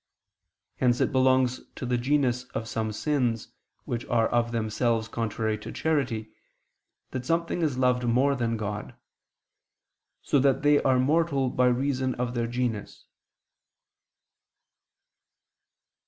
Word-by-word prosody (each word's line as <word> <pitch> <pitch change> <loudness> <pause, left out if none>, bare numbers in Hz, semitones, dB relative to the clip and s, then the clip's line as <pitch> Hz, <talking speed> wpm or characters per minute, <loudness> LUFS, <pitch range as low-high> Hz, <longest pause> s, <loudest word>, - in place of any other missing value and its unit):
Hence 125 -1 +2
it - - +1
belongs 130 -1 +3
to - - -5
the 125 0 0
genus 125 -1 +1
of 110 - -3
some 110 -1 -2
sins, 120 -2 -1 0.4
which 120 0 -3
are 115 -2 +2
of 120 0 +1
themselves 115 0 0
contrary 110 -1 -2
to - - -8
charity, 130 -9 -1 0.8
that 130 -1 -4
something 170 +4 -1
is 150 -6 0
loved 125 -1 +2
more 130 +4 +3
than 115 -3 -1
God; 105 -1 -5 1.3
so 140 - +2
that 135 +1 +2
they 145 0 +5
are 130 -1 +3
mortal 140 -1 +2
by 125 0 +3
reason 130 +1 0
of 120 0 -2
their 120 -1 -1
genus. 120 -3 -3
125 Hz, 125 wpm, -27 LUFS, 115-135 Hz, 1.3 s, they